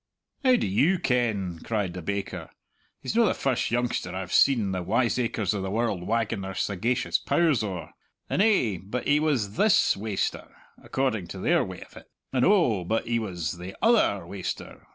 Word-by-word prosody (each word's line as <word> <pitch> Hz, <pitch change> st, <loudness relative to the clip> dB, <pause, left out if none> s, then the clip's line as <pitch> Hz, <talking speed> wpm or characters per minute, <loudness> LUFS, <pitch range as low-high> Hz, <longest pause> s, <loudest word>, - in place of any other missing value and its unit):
"How 255 Hz, -1 st, +5 dB
do -, -, 0 dB
you 140 Hz, -, +2 dB
ken?" 110 Hz, -, 0 dB
cried 105 Hz, -6 st, -2 dB
the 90 Hz, -, -6 dB
baker. 100 Hz, +3 st, -4 dB, 0.5 s
"He's -, -, -3 dB
no 235 Hz, -, +5 dB
the -, -, +1 dB
first 130 Hz, -3 st, 0 dB
youngster 120 Hz, -6 st, -1 dB
I've 95 Hz, -1 st, -5 dB
seen 115 Hz, -8 st, +4 dB
the 95 Hz, -1 st, -2 dB
wiseacres 115 Hz, +1 st, 0 dB
o' 100 Hz, -, -2 dB
the 95 Hz, -, -3 dB
world 105 Hz, -4 st, -1 dB
wagging 115 Hz, -3 st, 0 dB
their 95 Hz, 0 st, -6 dB
sagacious 110 Hz, +6 st, 0 dB
pows 160 Hz, -8 st, +2 dB
owre; 95 Hz, -5 st, -5 dB, 0.4 s
and, -, -, 0 dB
eh, 130 Hz, -, +2 dB
but 105 Hz, +6 st, -4 dB
he 145 Hz, +1 st, +4 dB
was 125 Hz, -10 st, 0 dB
this 215 Hz, -2 st, +4 dB
waster! 105 Hz, 0 st, -3 dB, 0.3 s
according 120 Hz, -9 st, -1 dB
to -, -, -8 dB
their -, -, +2 dB
way -, -, -8 dB
of -, -, -20 dB
it -, -, -14 dB, 0.2 s
and, 130 Hz, -2 st, +2 dB
oh, 160 Hz, -, +3 dB
but 110 Hz, +6 st, -1 dB
he 115 Hz, 0 st, 0 dB
was 90 Hz, -6 st, -4 dB
the 90 Hz, +2 st, -8 dB
other 215 Hz, -, +3 dB
waster! 95 Hz, +1 st, -6 dB
110 Hz, 180 wpm, -26 LUFS, 95-130 Hz, 0.5 s, How